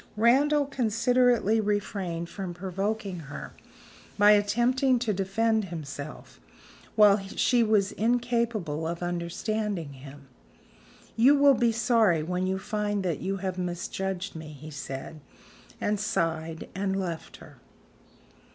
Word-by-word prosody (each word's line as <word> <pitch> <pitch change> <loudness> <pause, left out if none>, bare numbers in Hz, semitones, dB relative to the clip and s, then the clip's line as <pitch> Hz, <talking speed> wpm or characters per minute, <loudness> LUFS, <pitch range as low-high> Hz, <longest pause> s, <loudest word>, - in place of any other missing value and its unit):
Randal 280 +6 +4
considerately 240 -3 +2
refrained 195 -5 -2
from 180 -1 -6
provoking 195 +1 -3
her 145 -2 -8 0.6
by 205 0 +7
attempting 240 +6 +3
to 230 -3 -1
defend 215 +3 +1
himself, 150 -4 -8 0.6
while 210 -1 +6
she 215 +5 +1
was 215 -3 +2
incapable 230 -9 0
of 170 +1 -4
understanding 175 0 -3
him. 140 +1 -12 0.9
"You 255 +6 +6
will 280 -1 +6
be 240 -2 +2
sorry 225 -8 +3
when 180 +3 -1
you 190 0 0
find 205 0 -2
that 170 -5 -1
you 195 +2 -2
have 185 -1 -4
misjudged 185 +2 -3
me," 160 -1 -7
he 155 +2 -10
said, 140 +1 -7 0.6
and 210 0 0
sighed, 165 -6 -2
and 195 0 -1
left 170 -4 -5
her. - - -15
200 Hz, 120 wpm, -27 LUFS, 170-225 Hz, 0.9 s, by